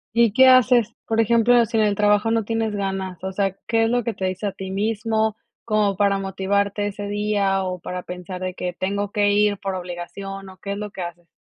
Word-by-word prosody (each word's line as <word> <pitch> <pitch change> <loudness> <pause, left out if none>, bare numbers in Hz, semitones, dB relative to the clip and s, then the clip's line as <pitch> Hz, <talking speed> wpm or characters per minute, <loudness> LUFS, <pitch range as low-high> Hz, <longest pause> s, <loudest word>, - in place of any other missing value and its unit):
¿Y 235 -2 +5
qué 260 +4 +6
haces? 250 -3 +5
Por 225 0 0
ejemplo, 235 +1 +4
si 225 - -6
en 220 - +4
el 205 -1 +1
trabajo 210 +1 +3
no 225 -1 +1
tienes 225 -1 -1
ganas, 190 -2 -3
o 190 - -3
sea, 195 0 -1
¿qué 225 -1 +2
es - - +1
lo 245 0 +1
que 230 - -2
te 190 - -4
dices 185 +2 -3
a - - -7
ti 190 0 -7
mismo? 220 +2 0 0.3
Como 210 -3 +1
para 200 -1 +2
motivarte 200 +1 -1
ese 205 0 -4
día, 205 -2 0
o 185 -1 -3
para 180 +1 -6
pensar 180 +1 -7
de 185 0 -3
que 180 -1 -4
tengo 200 +3 -2
que 205 -1 +2
ir 205 0 +3
por 195 0 -4
obligación, 190 +2 -6
¿o 185 - -14
qué 200 +1 -5
es - - -5
lo 210 0 -5
que 190 - -7
haces? 175 0 -7
200 Hz, 230 wpm, -22 LUFS, 190-220 Hz, 0.3 s, qué